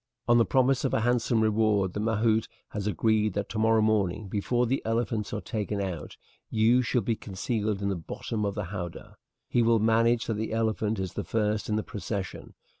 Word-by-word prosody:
"On 120 0 +5
the 115 - +4
promise 130 0 +2
of - - +1
a - - +1
handsome 120 -1 +2
reward 105 -3 +2
the - - -3
mahout 110 0 +1 0.2
has 105 -1 -4
agreed 105 +2 +1
that 100 +1 -3
tomorrow 110 0 +3
morning, 105 -2 +1
before 120 +5 0
the 130 +3 0
elephants 115 -2 -1
are - - -3
taken 105 -3 -3
out, 90 -6 -4 0.3
you 115 +3 +4
shall 125 -1 0
be 115 +2 0
concealed 105 0 -2
in 100 - +1
the 100 - 0
bottom 105 +6 -4
of 100 -1 -1
the 105 - -2
howdah. 90 -4 -6 0.3
He 120 - +2
will 115 0 +4
manage 115 +2 +3
that 115 - -2
the 110 +1 -3
elephant 110 -1 0
is 95 -2 -3
the - - -3
first 105 -1 -1
in 105 - +1
the 110 - 0
procession. 100 -2 -5
110 Hz, 195 wpm, -28 LUFS, 105-115 Hz, 0.3 s, On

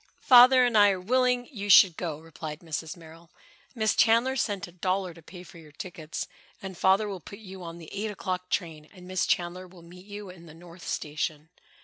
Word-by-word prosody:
"Father 255 0 +7
and 240 -2 0
I 205 -1 +7
are 190 -2 -1
willing 250 +4 +1
you 205 -5 -6
should 185 -3 +7
go," 160 -4 -4
replied 160 -1 -9
Mrs. 160 +1 -5
Merrill. 165 0 -15 0.5
"Miss 220 -3 +1
Chandler 235 +4 +3
sent 200 -6 -2
a - - -14
dollar 185 +1 -2
to 165 - -16
pay 180 +3 -12
for 170 -1 -14
your 155 -2 -15
tickets, 165 0 -7 0.3
and 190 -1 -8
Father 190 +4 +2
will 195 -2 -5
put 200 - -11
you 190 -3 -11
on 170 -1 -8
the 165 -2 -12
eight 210 +2 -3
o'clock 185 -3 -4
train 155 -4 -3
and 180 -1 -13
Miss 185 -1 -1
Chandler 180 +1 -1
will 175 -1 -16
meet 180 +3 -15
you 205 -2 -8
in 170 -2 -15
the 155 - -13
North 175 +1 -13
Station." 150 +1 -4
185 Hz, 210 wpm, -27 LUFS, 165-205 Hz, 0.5 s, Father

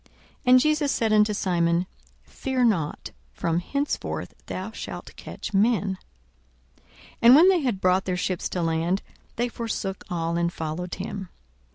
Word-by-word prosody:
And 255 0 +8
Jesus 305 0 +2
said 225 -2 +1
unto 210 0 +4
Simon, 175 -3 +1 0.4
Fear 260 -1 -2
not; 170 -10 0 0.2
from 165 0 0
henceforth 280 +11 -3
thou 190 +4 -5
shalt - - -8
catch - - -8
men. 200 -2 +2 0.8
42:005:011 - - -34 0.3
And 235 +2 +9
when 340 +6 +8
they 375 -2 +4
had 245 -8 -1
brought 185 +1 +2
their 185 -1 -1
ships 180 0 -2
to 180 - -2
land, 165 +4 0 0.3
they 240 +1 0
forsook 225 -5 -4
all, 170 -1 -1
and 170 0 +1
followed 165 +2 -4
him. 195 -1 -6
195 Hz, 150 wpm, -25 LUFS, 175-235 Hz, 0.8 s, And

